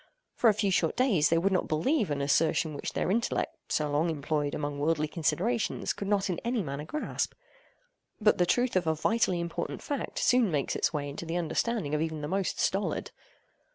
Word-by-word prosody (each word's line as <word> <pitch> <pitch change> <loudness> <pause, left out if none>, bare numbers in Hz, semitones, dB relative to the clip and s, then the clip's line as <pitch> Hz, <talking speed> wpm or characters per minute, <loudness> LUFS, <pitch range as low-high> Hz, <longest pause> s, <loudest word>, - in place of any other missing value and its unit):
For 235 - +4
a - - +5
few 205 -2 +1
short 165 -3 +1
days 230 - +3
they 165 - +3
would 190 +4 +2
not 185 - +1
believe 210 - +1
an 140 -1 -1
assertion 155 +2 +2
which 145 - -5
their - - 0
intellect 230 +3 0 0.2
so 150 - +1
long 150 +3 +1
employed 145 -1 -1
among 145 -1 -3
worldly 155 +1 +1
considerations 190 +9 0
could 200 - -5
not 200 -1 +1
in 180 -3 -2
any 235 -2 -1
manner 140 0 -5
grasp. 300 - -3 0.8
But 210 -3 +3
the 175 - +3
truth 245 +5 +1
of 180 -3 +1
a 160 - +2
vitally 185 +1 +1
important 170 0 -4
fact 285 -2 -4
soon 245 -4 +3
makes 145 -4 -1
its - - +1
way 145 -3 -2
into 145 +4 -6
the 165 +2 -1
understanding 175 0 -1
of 150 - +1
even 160 -1 -2
the 145 - -3
most 190 +3 -1
stolid. 195 +2 0
170 Hz, 200 wpm, -29 LUFS, 150-210 Hz, 0.8 s, a